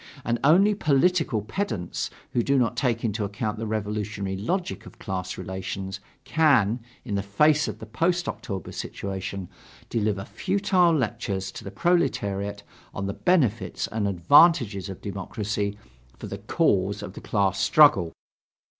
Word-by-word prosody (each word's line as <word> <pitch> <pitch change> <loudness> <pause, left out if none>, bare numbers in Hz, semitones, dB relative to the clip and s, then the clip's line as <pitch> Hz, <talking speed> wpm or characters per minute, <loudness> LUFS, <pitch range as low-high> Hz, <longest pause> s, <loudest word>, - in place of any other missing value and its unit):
And 120 0 0
only 185 +9 +5
political 155 - +2
pedants 110 - -3 0.2
who 120 - +2
do 140 +3 +2
not 120 -3 +1
take 120 -3 0
into 105 -1 -1
account 105 +2 -3
the 115 - -3
revolutionary 105 -2 -3
logic 175 - -3
of - - -14
class 95 -1 -4
relations, 95 +1 -5 0.2
can, 130 -7 +3 0.3
in 110 - -4
the 100 - +1
face 150 +10 +3
of - - -5
the 110 - -9
post 170 +10 0
October 95 -6 -5
situation, 95 -1 -5 0.4
deliver 105 -3 0
futile 190 -2 +2
lectures 100 -7 -2
to - - -9
the - - -6
proletariat 100 - 0 0.3
on 100 - -3
the 100 - -2
benefits 120 - +1
and 105 -1 -2
advantages 100 - +4
of 95 - -8
democracy 100 +1 -3 0.4
for - - -8
the - - -6
cause 100 +2 +1
of 95 -2 -7
the - - -9
class 100 -2 0
struggle. 100 - +5
105 Hz, 145 wpm, -25 LUFS, 100-145 Hz, 0.4 s, only